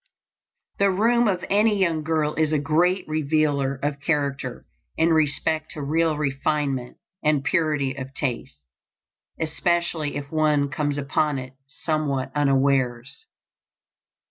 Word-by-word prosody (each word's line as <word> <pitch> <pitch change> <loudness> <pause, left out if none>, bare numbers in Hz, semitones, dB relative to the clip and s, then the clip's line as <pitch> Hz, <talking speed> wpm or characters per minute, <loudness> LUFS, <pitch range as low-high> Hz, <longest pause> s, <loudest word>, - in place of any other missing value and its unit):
The 200 0 +4
room 230 +5 +3
of 185 -4 -1
any 210 +1 +3
young 170 -5 +1
girl 155 -1 0
is 155 -1 +1
a 155 - +2
great 170 +6 +1
revealer 150 -3 +1
of 145 -1 -1
character 140 -4 -2 0.3
in 160 +1 +3
respect 155 +1 +1
to 150 - -6
real 160 +2 +1
refinement 140 -2 -1 0.3
and 150 -2 +2
purity 150 -4 +1
of 135 0 -7
taste, 120 - -4 0.8
especially 165 -1 -1
if 140 -1 -6
one 150 -2 +2
comes 145 0 -1
upon 145 +1 0
it 130 0 -7
somewhat 145 -3 -2
unawares. 135 - +1
150 Hz, 120 wpm, -24 LUFS, 140-160 Hz, 0.8 s, The